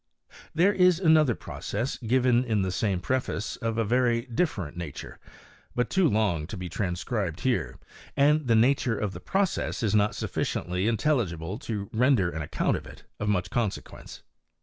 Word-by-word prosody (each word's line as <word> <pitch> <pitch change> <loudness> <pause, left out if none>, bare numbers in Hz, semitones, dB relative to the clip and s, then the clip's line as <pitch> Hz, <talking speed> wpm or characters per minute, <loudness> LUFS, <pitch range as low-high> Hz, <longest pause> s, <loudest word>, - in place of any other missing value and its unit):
There 185 +5 +4
is 180 -3 +4
another 155 - +4
process 115 +7 -4
given 125 0 +2
in 110 -5 0
the 95 - -1
same 95 -1 -1
preface 125 -1 -2
of 115 -2 -2
a 115 - +2
very 120 +1 +2
different 115 - -2
nature, 85 -5 -7 0.6
but 125 -1 0
too 185 -4 +3
long 100 -9 0
to 105 - -7
be 90 -1 -5
tran 90 -2 -2
scribed 95 -6 -3
here, 130 -2 -1 0.4
and 150 0 +3
the 115 - +4
nature 120 0 +3
of 105 -2 -2
the - - -7
process 190 -8 -1
is 110 - +1
not 105 0 +2
suf - - -5
ficiently 90 +4 -1
intelligible 105 - -1
to 105 -7 -4
render 115 -6 +3
an 80 - -4
account 75 - 0
of - - -10
it - - -13 0.2
of 105 - -1
much 90 -3 0
consequence. 115 -5 -4
115 Hz, 170 wpm, -27 LUFS, 95-130 Hz, 0.6 s, There